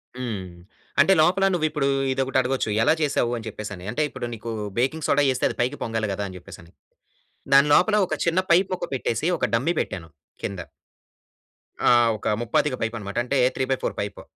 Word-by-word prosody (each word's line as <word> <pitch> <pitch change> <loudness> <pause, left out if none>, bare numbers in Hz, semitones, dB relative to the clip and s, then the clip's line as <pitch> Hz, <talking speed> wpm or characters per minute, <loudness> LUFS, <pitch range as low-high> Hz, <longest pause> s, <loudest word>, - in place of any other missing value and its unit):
హ్మ్. 115 -7 -4 0.6
అంటే 195 - +5
లోపల 190 +4 +3
నువ్వు 165 -3 +1
ఇప్పుడు 150 -3 -1 0.2
ఇదొకటి 130 0 0
అడగొచ్చు 130 -2 -1
ఎలా 135 - +4
చేసావు? 140 -5 +1
అని 115 - -8
చెప్పేసని 105 -4 -7
అంటే 145 - -2
ఇప్పుడు 130 -3 -6
నీకు 115 +1 -7 0.3
బేకింగ్ 140 +5 0
సోడా 145 - +3
యేస్తే 130 - 0
అది - - -7
పైకి 130 +4 -1
పొంగాలి 110 -2 -2
గదా! 100 - -3
అని 90 - -9
చెప్పేసని 85 -1 -13 0.8
దాని 140 +1 +7
లోపల 210 +7 +4
ఒక - - -2
చిన్న 170 +2 +2
పైప్ 185 +3 +5
మొక్క 180 - -3
పెట్టేసి 120 +3 -1
ఒక - - 0
డమ్మీ 135 +9 +1
పెట్టాను 80 -3 -6 0.3
కింద. 100 -2 -4 1.3
ఆహ్, 120 -1 +5
ఒక - - -6
ముప్పాతిక 130 +4 +1
పైప్ 115 +1 -2
అన్నమాట. 100 -1 -7
అంటే 135 +3 -1 0.2
3/4 130 0 -1
పైప్. 100 -1 -5
125 Hz, 175 wpm, -24 LUFS, 110-145 Hz, 1.3 s, దాని